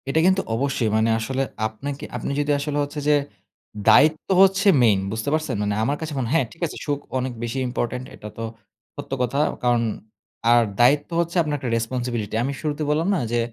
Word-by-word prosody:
এটা 160 - +2
কিন্তু 190 +1 +3
অবশ্যই 135 -2 0
মানে 110 +1 +2
আসলে 130 +4 -1 0.2
আপনাকে, 135 +6 -6
আপনি - - -4
যদি 145 0 +1
আসলে 145 0 -2
হচ্ছে 145 +1 -5
যে 150 - +6 0.7
দায়িত্ব 155 +8 +5
হচ্ছে 195 +1 +4 0.2
মেইন 105 -4 +4
বুঝতে 110 +5 -2
পারছেন? 155 -4 -1
মানে 105 0 0
আমার 140 +6 0
কাছে 160 -1 -4
মনে 120 -3 -2
হ্যাঁ, 165 -5 +3
ঠিক 170 - -22
আছে - - -9
সুখ 145 -1 -1 0.2
অনেক 130 0 -2
বেশি 120 +3 -3
ইম্পোর্টেন্ট 125 +1 -3
এটা 105 - -9
তো 115 - -4 0.5
সত্য - - -8
কথা। 125 +3 0 0.2
কারণ 120 -1 +3 0.7
আর 120 0 +6 0.2
দায়িত্ব 140 +4 +4
হচ্ছে 170 +1 -1
আপনার 150 -2 -1
একটা 130 - -3
রেসপনসিবিলিটি। 115 -2 -2
আমি 140 +3 -2
শুরুতে 150 -1 -2
বললাম 155 +4 +1
না - - 0
যে 120 - +1
135 Hz, 190 wpm, -23 LUFS, 120-150 Hz, 0.7 s, যে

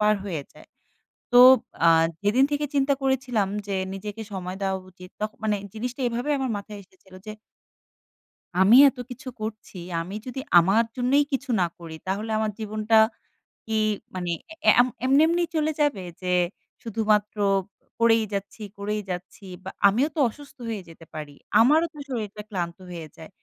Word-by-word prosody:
পার 210 0 +4
হয়ে 170 -7 -3
যায়। - - -17 0.6
তো 245 - +7 0.5
আ - - +8 0.3
যেদিন 220 +6 +4
থেকে 295 0 0
চিন্তা 280 0 +3
করেছিলাম 255 -6 0 0.2
যে, 200 -1 -2 0.2
নিজেকে 210 +3 -6
সময় 185 -1 -5
দেওয়া 190 -1 0
উচিত, 180 0 -14
তখ 215 0 -1
মানে 215 -1 +1 0.2
জিনিসটা 245 +4 -5
এভাবে 240 +5 -3
আমার 265 -2 -1
মাথায় 205 +1 -8
এসেছিল 185 0 -21
যে 215 - -5 1.3
"আমি 200 +5 +7
এত 270 - -5
কিছু 260 +2 -8
করছি 215 -2 -6 0.2
আমি 180 +4 -6
যদি 255 +1 -5 0.2
আমার 195 +7 +4
জন্যই 260 +4 +3
কিছু 270 0 -2
না 175 - +3
করি 165 -2 -9
তাহলে 205 +4 -2
আমার 215 0 0
জীবনটা 215 +1 0 0.7
কি 220 - -4 0.4
মানে 180 -2 -2 0.3
অ্যা - - +7
অ্যা 245 - +7
এম - - -1 0.2
এমনি, 270 +3 +5
এমনি 345 +1 +1
চলে 310 0 +1
যাবে? 285 -11 +1 0.2
যে 180 -1 -2 0.5
শুধুমাত্র 215 -1 0 0.6
করেই 230 -1 +4
যাচ্ছি, 200 +2 -5
করেই 210 +1 -2
যাচ্ছি। 180 +2 -7 0.2
বা 190 - -6 0.2
আমিও 235 +9 +2
তো - - -2
অসুস্থ 285 +4 -14
হয়ে 215 -3 -3
যেতে 165 0 -14
পারি। 150 -2 -7 0.3
আমারও 305 +8 +4
তো - - -16
শরীরটা 215 -4 -4
ক্লান্ত 175 -4 -3
হয়ে 165 -2 -7
যায়। 160 - -11
215 Hz, 165 wpm, -25 LUFS, 190-250 Hz, 1.3 s, আ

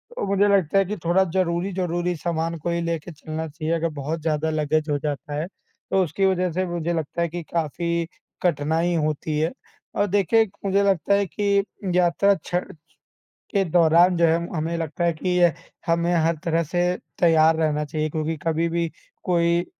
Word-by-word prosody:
तो - - -2
मुझे 200 +1 +3
लगता 195 -3 +3
है 195 - +4
कि 205 +3 -3
थोड़ा 175 +3 +4
ज़रूरी-ज़रूरी 175 -1 0
सामान 165 0 -2
को 160 +2 -4
ही 170 0 0
लेके 170 0 -3
चलना 160 +1 -5
चाहिए। 155 +2 -3
अगर 165 0 0
बहुत 155 +4 -3
ज़्यादा 155 0 0
लगेज़ 155 0 0
हो 145 - +2
जाता 145 +1 -4
है, 165 - -4
तो 190 0 -3
उसकी 180 +4 0
वज़ह 185 -1 +1
से 185 +3 -1
मुझे 175 -1 -2
लगता 165 +1 -3
है 170 - +2
कि 175 +1 -5
काफ़ी 170 +1 -1 0.4
कठिनाई 165 +1 +1
होती 155 0 -2
है। 160 +2 +1 0.4
और 205 - +2
देखिए 205 +3 +3 0.2
मुझे 200 +1 +2
लगता 195 -1 +2
है 200 0 +2
कि 200 +2 0 0.4
यात्रा 180 +3 +4
छ - - -4 1.0
के 200 -2 +2
दौरान 170 +2 +5
जो 170 - +3
है 165 0 +3 0.2
हमें 160 +2 -1
लगता 165 +1 -3
है 170 - +3
कि 165 +3 -4
यह 180 -2 +4 0.3
हमें 170 +1 +1
हर 165 0 +2
तरह 165 0 +1
से 175 +3 -1 0.4
तैयार 160 -2 +5
रहना 150 -2 0
चाहिए 155 +1 -2
क्योंकि 160 +1 -2
कभी 165 +1 +1
भी 170 0 -1 0.4
कोई 170 -1 +2
170 Hz, 180 wpm, -23 LUFS, 160-180 Hz, 1.0 s, दौरान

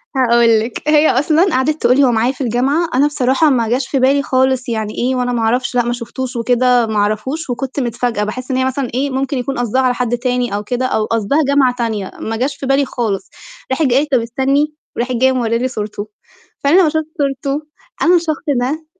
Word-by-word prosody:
هاقول 235 -3 +4
لِك، 235 +7 -4
هي 305 0 +5
أصلًا 305 +6 +3
قَعَدِت 295 +4 0
تقول 245 +1 +4
لي: 280 - +5
"هو 255 - +4
معايا 235 +2 +1
في 270 - -10
الجامعة،" 265 +7 +1
أنا 280 +3 +4
بصراحة 280 +1 +2
ما 235 -5 +1
جاش 255 +3 0
في 275 - -1
بالي 275 +2 +3
خالص، 260 -2 +1
"يعني 220 -2 -3
إيه؟ 255 +2 0
وأنا 250 -1 -1
ما 235 - -1
أعرفش. 245 +3 0
لأ، 245 - +3
ما 240 - -1
شُفتوش 250 +2 -6
وكده، 245 +1 +2
ما 220 - -3
أعرفوش." 215 +10 -1
وكنت 265 +3 -3
متفاجأة، 240 -3 -1
باحس 255 +5 -5
إن 260 - 0
هي 260 - +1
مثلًا 260 -1 -2
إيه 275 +3 0
ممكن 270 +1 -2
يكون 260 +2 -3
قصدها 245 +2 +1
على 255 -1 +2
حد 245 -1 -1
تاني 245 -2 -1
أو 205 - -3
كده، 245 +4 -2
أو 220 -4 0
قصدها 225 +4 0
جامعة 275 -3 +3
تانية، 220 -5 -3
ما 225 - -3
جاش 270 +4 -1
في 275 - -6
بالي 270 +1 +2
خالص. 225 -7 -3 0.4
راحت 265 +4 +1
جاية 255 -1 +3
قالت: 290 +1 0
"طَب 255 - +4
استنّي،" 270 +6 0 0.2
وراحة 250 +2 -2
جاية 260 +2 +3
مورّية 235 -3 0
لي 250 +2 -1
صورته. 210 -3 -5 0.6
فأنا 300 +7 +5
لمّا 320 - +3
شُفت 315 0 -1
صورته، 275 0 -1 0.4
أنا 350 +1 +5
الشخص 330 -2 -1 0.2
ده 295 +6 -2
255 Hz, 220 wpm, -16 LUFS, 235-275 Hz, 0.6 s, هي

